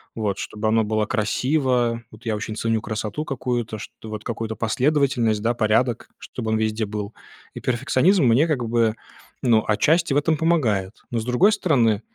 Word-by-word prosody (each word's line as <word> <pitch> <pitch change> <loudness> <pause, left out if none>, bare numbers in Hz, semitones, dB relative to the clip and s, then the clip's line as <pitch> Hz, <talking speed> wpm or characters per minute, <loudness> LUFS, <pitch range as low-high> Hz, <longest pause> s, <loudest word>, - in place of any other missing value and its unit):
вот, 105 -3 -2
чтобы 110 0 -4
оно 110 0 +3
было 110 0 0
красиво, 125 0 0
вот, 110 +2 -16
я 110 -1 0
очень 110 +1 -5
ценю 115 -1 0
красоту 110 +7 -4
какую-то, 120 -5 -3
чт 105 - -9
вот, 110 -1 -6
какую-то 110 -1 -4
последовательность, 125 -2 +1
да, 120 +2 +1
порядок, 115 +1 +1
чтобы 110 -3 -5
он 110 - +2
везде 110 0 -1
был. 105 +1 -5 0.4
И - - -7
перфекционизм 140 - +2
мне, 125 +8 +4
как 125 -7 -1
бы, 115 -1 +2 0.5
ну 115 -3 +3
отчасти 155 +8 +2
в - - +2
этом 155 +2 +2
помогает. 115 - +1 0.2
Но, 115 - 0
с 110 - -5
другой 125 +13 +4
стороны, 115 - +2
115 Hz, 175 wpm, -23 LUFS, 110-130 Hz, 0.5 s, мне